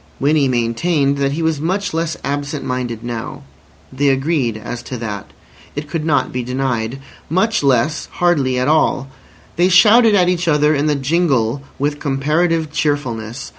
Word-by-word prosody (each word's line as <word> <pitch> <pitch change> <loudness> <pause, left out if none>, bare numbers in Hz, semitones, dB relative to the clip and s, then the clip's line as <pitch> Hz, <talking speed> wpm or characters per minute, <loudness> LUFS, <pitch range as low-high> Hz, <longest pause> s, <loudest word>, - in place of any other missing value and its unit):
Winnie 145 0 +2
maintained 135 +4 +1
that 140 0 +1
he 165 +2 -2
was 160 -3 0
much 185 +3 -1
less 165 0 -2
"absent 145 0 -3
minded" 125 -3 -3
now. 120 -2 -6 0.5
They 140 +2 +1
agreed 135 -4 0
as 120 +2 -6
to 125 +1 -6
that. 105 -4 -6 0.5
It 145 +1 -4
could 160 0 -3
not 155 -2 +1
be 125 - -2
denied. 125 -1 -2 0.3
Much 210 +7 +1
less—hardly 140 +1 +1
at 125 +1 0
all. 145 -3 +2 0.5
They 175 +2 +4
shouted 215 +5 +6
at 180 -3 +4
each 180 -1 0
other 150 -1 +3
in 145 +1 0
the 150 - +2
jingle 135 -4 +1 0.2
with 145 +2 -1
comparative 155 +3 0
cheerfulness. 130 -6 -2
145 Hz, 155 wpm, -18 LUFS, 125-160 Hz, 0.5 s, shouted